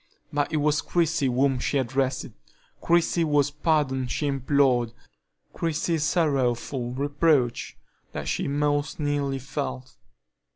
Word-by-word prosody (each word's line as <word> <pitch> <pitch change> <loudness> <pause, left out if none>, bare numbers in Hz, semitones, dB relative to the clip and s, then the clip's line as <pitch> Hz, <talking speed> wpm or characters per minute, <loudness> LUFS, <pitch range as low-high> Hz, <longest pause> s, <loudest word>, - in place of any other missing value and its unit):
But 145 +1 0
it 155 - 0
was 150 0 +2
Christie 165 -5 +1
whom 130 +1 +2
she 140 - 0
addressed, 130 +1 0 0.6
Christie 170 0 +2
whose 145 -3 +2
pardon 145 -4 0
she 150 - -2
implored, 135 -4 +2 0.6
Christie's 165 -1 -1
sorrowful 135 -6 0
reproach 145 -2 +1 0.3
that - - -5
she - - -1
most 145 +1 0
keenly 145 -2 -1
felt. 65 - -5
145 Hz, 115 wpm, -25 LUFS, 130-150 Hz, 0.6 s, was